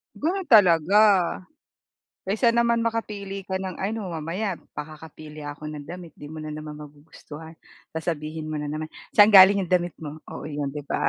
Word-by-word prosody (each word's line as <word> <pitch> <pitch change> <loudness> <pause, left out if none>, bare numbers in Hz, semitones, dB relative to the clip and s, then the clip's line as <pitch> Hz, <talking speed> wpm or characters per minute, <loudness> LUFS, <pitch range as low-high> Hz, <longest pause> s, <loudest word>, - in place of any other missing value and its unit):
Ganun 370 +5 -1
talaga. 190 - +5 1.3
Kaysa 220 +5 +2
naman 235 0 +2
makapili 205 -4 -3
ka 190 - -2
ng 190 -2 -5
ano, 205 -1 -3
"Mamaya 170 +5 -3 0.2
pakakapili 155 0 -9
ako 145 +1 -8
ng 150 -2 -8
damit 175 -2 -9
'di 145 - -9
mo 160 - -9
na 155 - -6
naman 150 0 -7
magugustuhan, 150 +2 -12 0.4
sasabihin 155 -1 -4
mo 150 - -2
na 150 - -4
naman 155 +1 -5 0.3
'saan 210 +1 +8
galing 195 0 +8
'yong 175 - -12
damit' 175 -1 +1
mo," 150 +1 -7
oo - - -8
'yon 145 -2 -3
'di 145 +1 -6
ba? - - 0
165 Hz, 170 wpm, -24 LUFS, 150-200 Hz, 1.3 s, saan